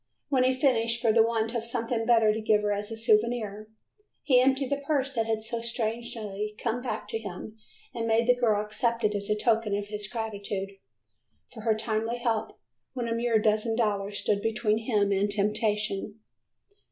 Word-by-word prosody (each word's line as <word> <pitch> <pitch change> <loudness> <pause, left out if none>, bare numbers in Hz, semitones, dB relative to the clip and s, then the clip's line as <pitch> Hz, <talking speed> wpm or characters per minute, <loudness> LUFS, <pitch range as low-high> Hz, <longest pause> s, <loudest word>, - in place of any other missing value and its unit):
When 260 -3 +3
he 255 - +4
finished, 235 -4 +1
for 230 -2 +2
the 230 - +6
want 225 0 +1
of 235 -2 -2
something 230 -1 -2
better 225 -3 +5
to 220 - -3
give 215 -1 +2
her 205 - +1
as 205 +2 -2
a 225 - -4
souvenir, 215 -1 +1 0.6
he 255 -3 +5
emptied 265 +1 +1
the 280 - +2
purse 275 -3 0
that 225 -3 0
had 220 -1 -1
so 230 +1 -3
strangely 220 -3 -3
come 235 +2 -2
back 225 -4 -4
to 225 - -2
him 210 +1 -8 0.4
and 230 -2 -3
made 225 +1 +3
the 250 - +5
girl 215 -4 +1
accept 230 +2 -1
it 210 0 +2
as 200 0 -3
a 210 - +3
token 220 -2 +1
of 205 0 -5
his 210 -1 -4
gratitude 205 -3 -4 0.8
for 225 - -9
her 220 0 +2
timely 225 +1 -1
help, 230 -2 -2 0.4
when 245 -3 -3
a 230 - -1
mere 230 -1 +2
dozen 215 +1 +1
dollars 205 -3 -1
stood 205 -1 0
between 220 0 +1
him 210 -3 +1
and 200 +1 +1
temptation. 210 0 0
225 Hz, 190 wpm, -28 LUFS, 210-235 Hz, 0.8 s, the